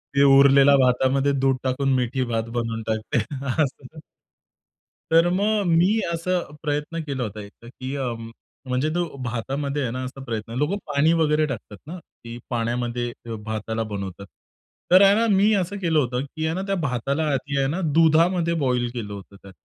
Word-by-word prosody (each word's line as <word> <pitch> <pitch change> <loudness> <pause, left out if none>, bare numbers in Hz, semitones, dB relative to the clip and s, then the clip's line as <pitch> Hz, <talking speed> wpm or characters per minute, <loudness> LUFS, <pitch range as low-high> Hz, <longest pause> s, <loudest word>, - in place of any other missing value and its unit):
ते 140 - +5
उरलेल्या 140 0 +6
भातामध्ये 130 +2 +2
दूध 135 -1 +2
टाकून 135 +1 0
मिठी 130 +1 0
भात 115 0 -2
बनवून 115 -1 -2
टाकते. 110 +1 -1 0.5
असं. 140 +2 -7 1.1
तर 165 +1 +5
मग 205 +3 +1
मी 200 +6 +3
असा 180 +2 -1 0.2
प्रयत्न 150 +3 -2
केला 135 -4 -3
होता 105 -1 -6
एकदा, 105 +3 -14
की 130 +2 -7
अ, 130 -4 -2 0.6
म्हणजे 130 +4 0
तो 175 - +1 0.2
भातामध्ये 135 +5 -3
आहे 120 -3 -2
ना 130 +1 -4
असा 130 +1 -7
प्रयत्न 115 -2 -5
लोकं 150 +9 0
पाणी 150 +2 +2
वगैरे 155 -1 +2
टाकतात 110 -6 -7
ना, 175 +4 -6
की 120 -6 -12
पाण्यामध्ये 120 0 -2 0.3
भाताला 110 +1 -3
बनवतात. 100 -1 -6 0.7
तर 185 - +8
आहे 200 0 +6
ना 230 +2 +2
मी 205 +3 +4
असं 195 +1 -2
केलं 165 -4 +2
होतं, 125 -2 -1
की 155 +3 -5
आहे 160 - 0
ना 190 - -2
त्या 195 - 0
भाताला 140 +3 -1
आधी 140 +1 -2
आहे 135 - +2
ना 170 +7 -2
दुधामध्ये 165 +2 +3
बॉईल 125 -2 +1
केलं 105 -4 -5
होतं 100 0 -11
त्यात. 100 -1 -15
135 Hz, 170 wpm, -23 LUFS, 120-160 Hz, 1.1 s, तर